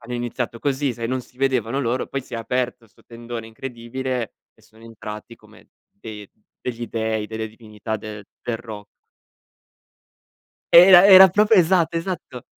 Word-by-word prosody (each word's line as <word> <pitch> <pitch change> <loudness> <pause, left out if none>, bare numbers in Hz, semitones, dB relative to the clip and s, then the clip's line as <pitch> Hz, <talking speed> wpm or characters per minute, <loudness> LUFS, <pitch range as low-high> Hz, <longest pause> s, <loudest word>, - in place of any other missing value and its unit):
Hanno 120 +1 -8
iniziato 120 0 -4
così, 140 0 -1
sai, 115 0 -4
non 130 +1 -2
si 125 - -20
vedevano 130 -1 0
loro, 125 0 -2
poi 135 - -5
si 125 - -10
è - - -2
aperto 120 0 -3
'sto 105 - -27
tendone 115 -1 -8
incredibile, 125 +1 -5 0.2
e - - -27
sono 110 +1 -21
entrati 110 0 -10
come - - -20 0.2
dei 105 -1 -11 0.4
degli 120 -1 -4
dei, 110 -1 -2
delle 110 0 -5
divinità 110 0 -7
de 105 0 -9 0.2
del 115 -2 -3
ro 110 -3 -10 1.9
Era 180 +2 +9
era 190 -1 +10
proprio, 210 +3 +3
esatto, 170 -1 +1
esatto! 165 -8 -6
120 Hz, 150 wpm, -21 LUFS, 110-135 Hz, 1.9 s, era